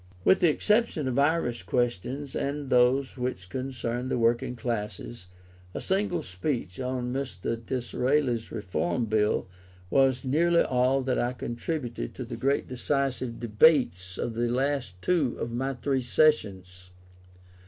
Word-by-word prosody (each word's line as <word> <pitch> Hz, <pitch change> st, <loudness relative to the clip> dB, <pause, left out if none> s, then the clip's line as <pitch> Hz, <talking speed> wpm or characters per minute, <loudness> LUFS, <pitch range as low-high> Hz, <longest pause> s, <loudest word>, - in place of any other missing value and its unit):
With 190 Hz, -, +5 dB
the 175 Hz, -, +5 dB
exception 210 Hz, -, +1 dB
of 130 Hz, +1 st, 0 dB
Irish 140 Hz, -, +1 dB
questions, 120 Hz, +7 st, -2 dB
and 140 Hz, 0 st, -3 dB
those 130 Hz, +2 st, +3 dB
which 125 Hz, -8 st, -3 dB
concerned 125 Hz, -1 st, -3 dB
the -, -, 0 dB
working 120 Hz, +1 st, +1 dB
classes, 115 Hz, -3 st, -4 dB, 0.5 s
a -, -, -2 dB
single 190 Hz, -4 st, 0 dB
speech 90 Hz, -, -3 dB
on 125 Hz, -1 st, -2 dB
Mr. 115 Hz, -3 st, -3 dB
Disraeli's 125 Hz, 0 st, 0 dB
Reform 100 Hz, -1 st, -1 dB
Bill 105 Hz, -2 st, +1 dB, 0.4 s
was 135 Hz, -1 st, +3 dB
nearly 170 Hz, +6 st, +3 dB
all 130 Hz, +1 st, +2 dB
that 130 Hz, -1 st, 0 dB
I 120 Hz, +1 st, 0 dB
contributed 120 Hz, -, -4 dB
to -, -, -5 dB
the -, -, -6 dB
great 140 Hz, +2 st, 0 dB
decisive 130 Hz, -1 st, -1 dB
debates 105 Hz, -, +3 dB
of 120 Hz, -, -2 dB
the 120 Hz, +1 st, 0 dB
last 125 Hz, -6 st, -1 dB
two 160 Hz, -9 st, +1 dB
of 115 Hz, -, -3 dB
my 135 Hz, +3 st, -1 dB
three 135 Hz, +2 st, 0 dB
sessions. 95 Hz, -10 st, +1 dB
125 Hz, 135 wpm, -27 LUFS, 115-140 Hz, 0.5 s, With